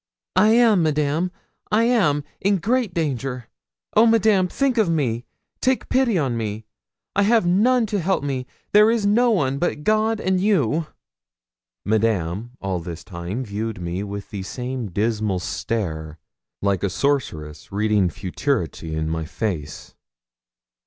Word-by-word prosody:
'I 190 Hz, +3 st, +5 dB
am, 230 Hz, -5 st, +5 dB
Madame 155 Hz, +3 st, +1 dB, 0.4 s
I 215 Hz, +2 st, +4 dB
am 190 Hz, -12 st, +2 dB, 0.2 s
in 200 Hz, +1 st, +2 dB
great 230 Hz, +3 st, 0 dB
danger! 135 Hz, -6 st, -2 dB, 0.5 s
Oh, 225 Hz, +2 st, +6 dB
Madame, 215 Hz, -4 st, +4 dB
think 260 Hz, +4 st, 0 dB
of 210 Hz, -6 st, +3 dB
me 125 Hz, -7 st, 0 dB, 0.4 s
take 260 Hz, 0 st, +1 dB
pity 255 Hz, -6 st, +2 dB
on 135 Hz, -7 st, 0 dB
me! 110 Hz, -1 st, -4 dB, 0.5 s
I 200 Hz, -, +3 dB
have 220 Hz, -1 st, +4 dB
none 225 Hz, +7 st, +3 dB
to 205 Hz, -1 st, -1 dB
help 190 Hz, -2 st, 0 dB
me 130 Hz, -3 st, -3 dB, 0.2 s
there 210 Hz, +1 st, +6 dB
is 225 Hz, -3 st, +1 dB
no 235 Hz, +5 st, +4 dB
one 140 Hz, -, +1 dB
but 170 Hz, -4 st, -1 dB
God 215 Hz, +3 st, +2 dB
and 185 Hz, -2 st, +1 dB
you!' 165 Hz, -, +2 dB, 1.0 s
Madame 110 Hz, 0 st, 0 dB
all 95 Hz, -2 st, -2 dB
this 85 Hz, 0 st, -7 dB
time 90 Hz, +6 st, -5 dB
viewed 110 Hz, 0 st, -4 dB
me 90 Hz, +2 st, -3 dB
with 100 Hz, -1 st, -6 dB
the 100 Hz, -, -4 dB
same 125 Hz, +2 st, -4 dB
dismal 105 Hz, 0 st, 0 dB
stare, 80 Hz, -5 st, -3 dB, 0.5 s
like 100 Hz, -3 st, +1 dB
a 100 Hz, -, 0 dB
sorceress 90 Hz, -, -2 dB
reading 105 Hz, -2 st, +2 dB
futurity 95 Hz, -, -2 dB
in 80 Hz, 0 st, -1 dB
my 80 Hz, 0 st, -2 dB
face. 85 Hz, -4 st, -4 dB
135 Hz, 145 wpm, -22 LUFS, -, 1.0 s, Oh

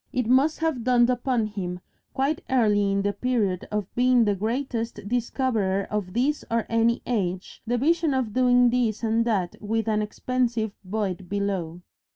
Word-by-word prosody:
It 250 Hz, -2 st, -1 dB
must 265 Hz, +6 st, +3 dB
have 315 Hz, -7 st, 0 dB
dawned 245 Hz, 0 st, +4 dB
upon 245 Hz, -2 st, 0 dB
him 185 Hz, -4 st, -5 dB, 0.4 s
quite 280 Hz, +3 st, 0 dB
early 210 Hz, -6 st, +3 dB
in 195 Hz, 0 st, 0 dB
the 205 Hz, 0 st, 0 dB
period 215 Hz, -8 st, -1 dB
of 210 Hz, -2 st, -3 dB
being 245 Hz, -1 st, +4 dB
the 205 Hz, -, +2 dB
Greatest 225 Hz, 0 st, -3 dB
Discoverer 225 Hz, -4 st, 0 dB
of 205 Hz, -4 st, -3 dB
This 275 Hz, +6 st, 0 dB
or 230 Hz, -1 st, 0 dB
Any 230 Hz, +1 st, +2 dB
Age, 190 Hz, -6 st, -3 dB
the 245 Hz, +1 st, +1 dB
vision 320 Hz, +2 st, +2 dB
of 245 Hz, -5 st, -1 dB
doing 245 Hz, -1 st, +4 dB
this 235 Hz, -3 st, 0 dB
and 225 Hz, +1 st, +1 dB
that 195 Hz, -7 st, -1 dB
with 225 Hz, +2 st, -1 dB
an 215 Hz, -1 st, +1 dB
extensive 235 Hz, 0 st, -1 dB
void 190 Hz, -2 st, -3 dB
below. 190 Hz, -4 st, -2 dB
225 Hz, 165 wpm, -25 LUFS, 205-250 Hz, 0.4 s, dawned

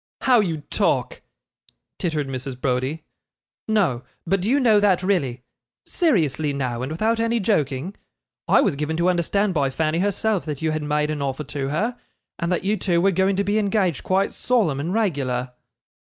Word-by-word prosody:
'How 255 Hz, -3 st, +5 dB
you 165 Hz, -7 st, -1 dB
talk!' -, -, 0 dB, 0.8 s
tittered 155 Hz, -5 st, -1 dB
Mrs. 130 Hz, -1 st, -5 dB
Browdie. 130 Hz, +4 st, -1 dB, 0.6 s
'No, 195 Hz, -, +1 dB, 0.2 s
but 195 Hz, +2 st, +1 dB
do 200 Hz, -, -1 dB
you 280 Hz, +3 st, +3 dB
know 225 Hz, -6 st, +5 dB
that 190 Hz, -3 st, +3 dB
really 140 Hz, -11 st, 0 dB, 0.4 s
seriously 160 Hz, -, +1 dB
now 125 Hz, -4 st, -2 dB
and 130 Hz, +3 st, -4 dB
without 220 Hz, +8 st, 0 dB
any 230 Hz, +1 st, +1 dB
joking 175 Hz, -, -1 dB, 0.5 s
I -, -, +5 dB
was -, -, +1 dB
given 150 Hz, +2 st, -2 dB
to 170 Hz, +2 st, +2 dB
understand 190 Hz, +3 st, 0 dB
by 140 Hz, -4 st, +1 dB
Fanny 155 Hz, +4 st, 0 dB
herself, 205 Hz, +1 st, 0 dB
that 150 Hz, -3 st, -4 dB
you 160 Hz, -1 st, 0 dB
had 155 Hz, 0 st, -2 dB
made 150 Hz, 0 st, 0 dB
an 150 Hz, -1 st, -3 dB
offer 140 Hz, +1 st, -2 dB
to 140 Hz, -1 st, -4 dB
her, 220 Hz, -, -1 dB, 0.4 s
and 170 Hz, +1 st, -1 dB
that 180 Hz, -, 0 dB
you 205 Hz, +2 st, +1 dB
two 175 Hz, -4 st, +1 dB
were 195 Hz, +3 st, +3 dB
going 190 Hz, +2 st, +2 dB
to 200 Hz, -, +1 dB
be 205 Hz, +2 st, +1 dB
engaged 195 Hz, -, +1 dB
quite 190 Hz, +1 st, +1 dB
solemn 205 Hz, -, +1 dB
and 160 Hz, +5 st, -2 dB
regular. 135 Hz, -, -1 dB
170 Hz, 180 wpm, -23 LUFS, 140-205 Hz, 0.8 s, How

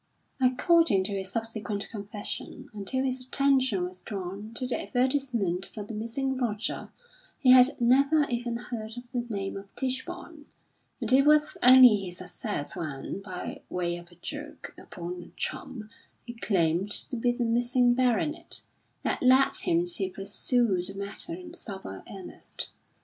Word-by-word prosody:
According 255 Hz, -, +4 dB
to 190 Hz, -, -2 dB
his 190 Hz, -1 st, -3 dB
subsequent 220 Hz, -3 st, -2 dB
confession, 205 Hz, -1 st, -5 dB
until 215 Hz, +6 st, -1 dB
his 260 Hz, -1 st, -2 dB
attention 260 Hz, -6 st, +2 dB
was 180 Hz, +1 st, -6 dB
drawn 200 Hz, +1 st, -6 dB
to 255 Hz, -, -1 dB
the 250 Hz, -, -1 dB
advertisement 245 Hz, -8 st, 0 dB
for 210 Hz, -, -7 dB
the 210 Hz, -, -8 dB
missing 245 Hz, +5 st, -2 dB
Roger, 225 Hz, -4 st, -2 dB, 0.5 s
he 255 Hz, -, +5 dB
had 255 Hz, +1 st, +7 dB
never 275 Hz, +5 st, +4 dB
even 240 Hz, -1 st, -2 dB
heard 230 Hz, -2 st, -6 dB
of 245 Hz, 0 st, -10 dB
the 245 Hz, -2 st, -2 dB
name 195 Hz, -3 st, -3 dB
of 195 Hz, 0 st, -8 dB
Tichborne, 295 Hz, +4 st, -4 dB, 0.5 s
and 240 Hz, -1 st, -1 dB
it 270 Hz, +1 st, +7 dB
was 300 Hz, +1 st, +4 dB
only 250 Hz, -3 st, +9 dB
his 180 Hz, -3 st, -6 dB
success 180 Hz, -3 st, -4 dB
when, 150 Hz, +4 st, -5 dB
by 185 Hz, -2 st, -6 dB
way 175 Hz, -1 st, -1 dB
of 175 Hz, 0 st, -10 dB
a -, -, -17 dB
joke 295 Hz, -, -7 dB
upon 180 Hz, -2 st, -7 dB
a -, -, -12 dB
chum, 220 Hz, -5 st, -4 dB, 0.3 s
he 235 Hz, -, -8 dB
claimed 185 Hz, -4 st, +1 dB
to 225 Hz, -, -1 dB
be 245 Hz, +1 st, +1 dB
the 240 Hz, 0 st, -1 dB
missing 245 Hz, +1 st, +3 dB
baronet, 255 Hz, +5 st, 0 dB, 0.4 s
that -, -, 0 dB
led 260 Hz, +1 st, +5 dB
him 350 Hz, -2 st, +1 dB
to 220 Hz, -, -1 dB
pursue 200 Hz, +1 st, +1 dB
the 195 Hz, +2 st, -7 dB
matter 200 Hz, +12 st, -4 dB
in 345 Hz, -1 st, -10 dB
sober 190 Hz, -, -7 dB
earnest. 190 Hz, -2 st, -5 dB
235 Hz, 155 wpm, -28 LUFS, 195-260 Hz, 0.5 s, only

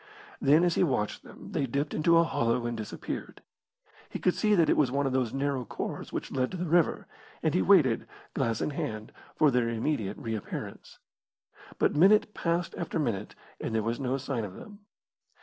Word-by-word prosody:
Then 150 Hz, +5 st, +5 dB
as 175 Hz, -1 st, +3 dB
he -, -, +2 dB
watched 125 Hz, -10 st, -1 dB
them -, -, -12 dB
they 135 Hz, -, -1 dB
dipped 140 Hz, +4 st, -2 dB
into 165 Hz, +2 st, +4 dB
a 165 Hz, -, +6 dB
hollow 120 Hz, -7 st, 0 dB
and 120 Hz, 0 st, -2 dB
disappeared. 110 Hz, -2 st, -6 dB, 0.7 s
He -, -, -4 dB
could 180 Hz, -, +2 dB
see 210 Hz, -1 st, +2 dB
that 170 Hz, -4 st, +4 dB
it -, -, +4 dB
was 135 Hz, -4 st, +2 dB
one 140 Hz, +1 st, 0 dB
of 135 Hz, -, 0 dB
those 130 Hz, -4 st, +1 dB
narrow 135 Hz, -1 st, -1 dB
khors -, -, -5 dB
which -, -, -4 dB
led 130 Hz, -1 st, 0 dB
to 185 Hz, -, -6 dB
the 180 Hz, -, -2 dB
river, 170 Hz, 0 st, +2 dB, 0.4 s
and -, -, +2 dB
he -, -, +3 dB
waited, -, -, +4 dB, 0.3 s
glass 115 Hz, -1 st, -1 dB
in -, -, -1 dB
hand, 135 Hz, -9 st, -4 dB, 0.2 s
for 150 Hz, -2 st, +4 dB
their 120 Hz, -2 st, +1 dB
immediate 115 Hz, -3 st, -2 dB
reappearance. 110 Hz, -3 st, -6 dB, 0.8 s
But -, -, +2 dB
minute 210 Hz, +6 st, +5 dB
passed 170 Hz, +1 st, -1 dB
after 170 Hz, -, -3 dB
minute 115 Hz, -10 st, -2 dB, 0.2 s
and 110 Hz, -, -3 dB
there 110 Hz, -, +1 dB
was 115 Hz, +2 st, -2 dB
no 135 Hz, 0 st, -1 dB
sign 135 Hz, -4 st, -3 dB
of 95 Hz, -3 st, -7 dB
them. 205 Hz, -1 st, -11 dB
135 Hz, 195 wpm, -29 LUFS, 115-165 Hz, 0.8 s, a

